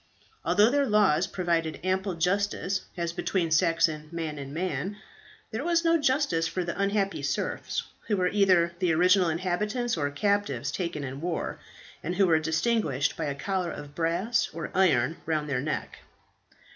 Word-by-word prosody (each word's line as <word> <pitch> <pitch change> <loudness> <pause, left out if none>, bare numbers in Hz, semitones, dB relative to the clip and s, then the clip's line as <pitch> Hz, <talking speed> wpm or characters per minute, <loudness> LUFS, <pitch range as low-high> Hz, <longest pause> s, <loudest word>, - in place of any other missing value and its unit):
Although 210 +3 +4
their 285 0 +2
laws 190 -6 +3
provided 170 -3 -1
ample 190 0 0
justice 195 +2 0 0.2
as 170 -1 -2
between 170 -2 -1
Saxon 165 -2 +2
man 160 -3 -4
and 135 0 -7
man, 185 +5 -3 0.5
there 225 +4 -3
was 340 0 +1
no 330 0 +4
justice 260 - +2
for 180 +2 -2
the 170 - -4
unhappy 200 0 0
serfs, - - -2 0.2
who 210 - +1
were 180 -1 +2
either 185 -4 +4
the 180 -3 +2
original 180 +2 +4
inhabitants 210 +8 -1
or 145 -3 -1
captives 200 +7 0
taken 170 -5 -3
in 135 +1 -6
war, 170 -1 -3 0.4
and 175 - -3
who 195 - +4
were 160 -3 +4
distinguished 160 - 0
by - - -3
a 140 -1 -2
collar 185 +3 -2
of 145 -3 -8
brass 170 +9 0
or 165 - -5
iron 160 -6 +3
round 155 -2 0
their 130 -3 -1
neck. 155 +3 -4
175 Hz, 160 wpm, -27 LUFS, 160-200 Hz, 0.5 s, Although